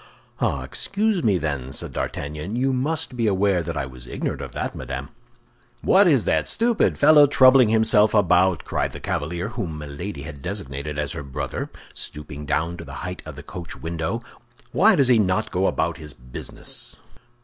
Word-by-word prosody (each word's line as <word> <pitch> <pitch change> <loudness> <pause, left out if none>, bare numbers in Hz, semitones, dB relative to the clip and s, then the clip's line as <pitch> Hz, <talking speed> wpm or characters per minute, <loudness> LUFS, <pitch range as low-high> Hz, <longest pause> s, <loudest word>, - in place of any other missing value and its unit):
"Ah, - - 0
excuse 205 -2 0
me, 100 -5 +3
then," 70 -6 -3
said - - -4
D'Artagnan. 75 +8 -4
"You 130 +2 +1
must 145 +2 -2
be 115 -2 +1
aware 95 -2 +2
that 85 -1 -4
I 70 - -1
was 65 -2 -10
ignorant - - -3
of - - -6
that, - - -3
madame." 65 +3 -6 0.7
"What 195 0 +6
is 135 -9 +4
that - - +1
stupid 230 -1 +2
fellow 150 0 +7
troubling 130 -3 +6
himself 110 -1 +4
about?" 90 -3 +3
cried - - -1
the - - -7
cavalier 85 +7 -3
whom 100 -9 -4
Milady 75 +2 -6
had 75 -3 -9
designated 75 -5 -5
as 75 -2 -1
her - - -5
brother, 70 +1 -4 0.2
stooping 75 -1 -6
down 80 +4 0
to 85 - -8
the 70 +1 -7
height 90 0 -5
of 80 - -7
the 75 - -9
coach 85 +1 -8
window. 85 +8 -3 0.5
"Why 210 +3 +5
does 135 -5 +4
not 105 -3 +3
he 110 - -13
go 95 +2 +1
about 85 +1 0
his 75 -3 -9
business?" 60 0 -5
90 Hz, 180 wpm, -23 LUFS, 75-115 Hz, 0.7 s, fellow